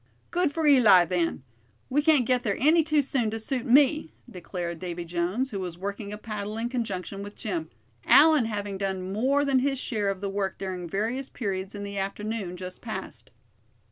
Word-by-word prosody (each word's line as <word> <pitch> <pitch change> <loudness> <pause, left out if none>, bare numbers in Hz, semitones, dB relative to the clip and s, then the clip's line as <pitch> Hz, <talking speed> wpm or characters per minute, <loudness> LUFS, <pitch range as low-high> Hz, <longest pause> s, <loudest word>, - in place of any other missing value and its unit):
"Good 350 -3 +1
for 320 +1 -1
Eli, 225 -11 +7
then; 170 -5 -1 0.4
we 290 +3 +2
can't 295 -5 +4
get 250 +1 +2
there 205 -6 -1
any 315 +5 +5
too 305 -2 +2
soon 250 -4 0
to 225 +1 -4
suit 255 +3 -2
me," 290 +5 +4
declared 175 -5 -5
Davy 175 -1 -5
Jones, 180 +10 -1
who 200 - -3
was 180 -3 -5
working 200 +2 -5
a 210 - -5
paddle 210 -1 -5
in 235 +1 -2
conjunction 200 -5 -4
with 205 +1 -8
Jim; 330 -2 -4 0.4
Allan 310 -6 +6
having 205 -3 -4
done 190 -1 -3
more 275 +7 +2
than 270 -2 +3
his 270 +1 0
share 215 -6 -1
of 195 -1 -2
the 200 - -3
work 195 -1 -2
during 185 -3 -5
various 230 +8 -2
periods 195 -3 -4
in 205 - -5
the 200 0 -4
afternoon 200 -1 -4
just 185 0 -8
passed. - - -7
210 Hz, 190 wpm, -27 LUFS, 190-260 Hz, 0.4 s, Eli